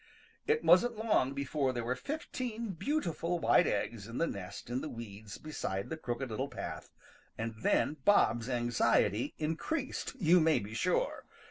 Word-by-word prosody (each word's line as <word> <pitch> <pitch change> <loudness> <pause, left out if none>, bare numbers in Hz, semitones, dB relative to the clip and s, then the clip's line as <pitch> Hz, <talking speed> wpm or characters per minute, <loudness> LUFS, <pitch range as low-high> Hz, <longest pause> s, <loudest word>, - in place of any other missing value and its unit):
It 455 +1 +2
wasn't 235 +6 +5
long 210 - +2
before 140 -1 0
there 120 -1 -2
were 125 +2 -1
fifteen 235 - -4
beautiful 175 - -1
white 170 - +4
eggs 110 -3 -2
in 115 - -6
the 165 - +2
nest 100 - -6
in 125 +2 -1
the 155 - -4
weeds 110 -3 -8
beside 100 -10 -4
the - - -1
Crooked 125 -3 -4
Little 130 +6 -2
Path, 120 - -6 0.5
and 115 +1 -3
then 150 - +2
Bob's 120 - +4
anxiety 120 -2 +2
increased, 250 - -2
you 180 -1 +6
may 160 -1 +4
be 105 +2 -5
sure. 185 - 0
145 Hz, 155 wpm, -32 LUFS, 120-185 Hz, 0.5 s, you